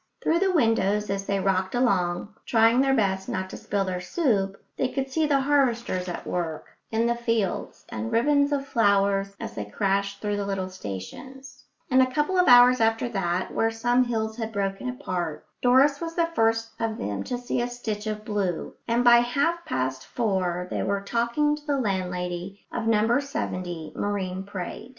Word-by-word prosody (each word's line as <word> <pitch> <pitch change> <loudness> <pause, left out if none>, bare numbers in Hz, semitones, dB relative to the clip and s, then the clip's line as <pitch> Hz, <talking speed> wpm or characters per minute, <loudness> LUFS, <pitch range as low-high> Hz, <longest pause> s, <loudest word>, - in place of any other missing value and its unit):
Through 335 - +2
the 385 0 +2
windows, 210 - +2
as 195 0 -3
they 200 0 0
rocked 190 0 0
along, 195 -5 +1
trying 230 +2 +4
their 270 0 +3
best 190 -4 0
not 190 0 -3
to - - -7
spill 200 -1 -1
their 180 -1 -3
soup, 195 - 0 0.2
they 260 - 0
could 270 +1 -3
see 315 +2 +1
the 280 -2 +3
harvesters 240 -10 +1
at 175 - -6
work 165 -3 -4
in 225 +1 +1
the 235 - +2
fields, 230 -5 -2
and 110 +1 -4
ribbons 285 +3 +3
of 280 -1 0
flowers 200 -4 +2
as - - -6
they 105 - -4
crashed 195 - -1
through 205 -1 -2
the 200 - -2
little 190 -2 -2
stations; 255 - -9 0.3
and 260 +1 +6
a 255 - +3
couple 295 +7 0
of 360 - +4
hours 245 0 +7
after 225 +2 +2
that, 185 -4 -2
where 225 - +2
some 240 +3 +2
hills 220 -2 -2
had 225 -1 -4
broken 200 +3 -2
apart, 185 - -4 0.2
Doris 270 +4 +4
was 330 0 -4
the 335 - +3
first 225 -3 +1
of 225 -1 -1
them 100 -1 -3
to 245 - -2
see 245 0 -2
a 240 - 0
stitch 220 -3 -5
of 215 0 -4
blue; 200 -5 -2
and 235 +1 +2
by 240 -1 +8
half 280 +8 +1
past 130 - -2
four 185 -6 -1
they - - -1
were 200 0 -1
talking 235 +8 +1
to 300 0 -13
the 285 -1 +1
landlady 185 -3 -3
of 230 -2 -3
number 225 +4 +3
70 180 - -4
Marine 190 -2 -2
Parade. 195 +4 -6
220 Hz, 185 wpm, -26 LUFS, 190-250 Hz, 0.3 s, by